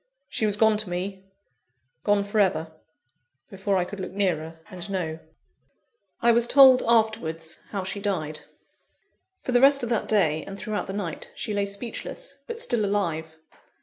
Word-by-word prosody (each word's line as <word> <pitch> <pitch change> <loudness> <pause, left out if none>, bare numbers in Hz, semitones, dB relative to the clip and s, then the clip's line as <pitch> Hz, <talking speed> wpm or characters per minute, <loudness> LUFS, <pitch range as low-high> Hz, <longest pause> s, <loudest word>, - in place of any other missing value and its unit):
She 220 - 0
was 205 -1 +2
gone 220 0 +4
to 210 -3 -1
me, 190 +2 -4 0.8
gone 205 -1 +3
for 205 +2 -1
ever 165 -5 +1 0.8
before 195 0 0
I 180 - +1
could 205 +2 -8
look 185 -1 -5
nearer, 165 -5 -1
and 180 +1 -8
know. 165 -5 -3 1.0
I 235 - +6
was 235 0 +3
told, 260 -1 +8
afterwards, 215 -8 +1
how 195 -2 -3
she 190 +2 -4
died. 165 -7 -2 1.0
For - - -2
the 245 0 +4
rest 275 -1 +6
of 235 - -2
that 230 -3 0
day, 160 -8 +2
and 195 - -8
throughout 210 +1 -3
the 190 - -5
night, 190 -6 -5
she 215 - -3
lay 200 0 0
speechless, 230 - -5
but 465 -1 -5
still 240 - 0
alive. 165 -6 -1
200 Hz, 165 wpm, -25 LUFS, 180-220 Hz, 1.0 s, told